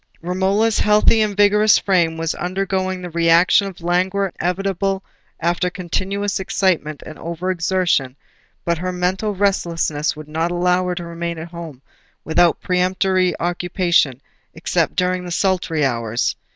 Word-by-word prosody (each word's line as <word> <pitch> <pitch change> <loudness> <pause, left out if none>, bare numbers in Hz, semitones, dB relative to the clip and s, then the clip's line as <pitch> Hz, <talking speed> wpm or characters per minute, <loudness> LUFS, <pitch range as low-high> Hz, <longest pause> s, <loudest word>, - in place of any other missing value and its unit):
Romola's 195 +5 +1
healthy 210 +1 +4
and 210 -2 -1
vigorous 210 +1 +5
frame 170 -4 +1
was 165 0 -1
undergoing 185 0 -2
the 175 - -6
reaction 170 +4 +4
of 190 -3 -10
languor 185 +3 0
inevitable 195 +1 -1 0.4
after 175 +2 0
continuous 195 +3 -2
excitement 180 -6 -1
and 155 - -10
over 170 +2 -3
exertion; 175 -7 0 0.5
but 170 -1 0
her 185 +1 -2
mental 185 +4 -1
restlessness 170 -6 0
would 155 0 -10
not 160 +2 -1
allow 180 +1 +1
her 180 - -1
to 175 - -5
remain 170 0 -5
at 160 +2 -7
home 165 -6 -9 0.4
without 165 +1 +3
peremptory 185 0 +1
occupation, 175 -5 +1 0.4
except - - -1
during 180 0 0
the 180 - -7
sultry 175 -4 0
hours. 115 -2 -1
180 Hz, 140 wpm, -20 LUFS, 170-190 Hz, 0.5 s, vigorous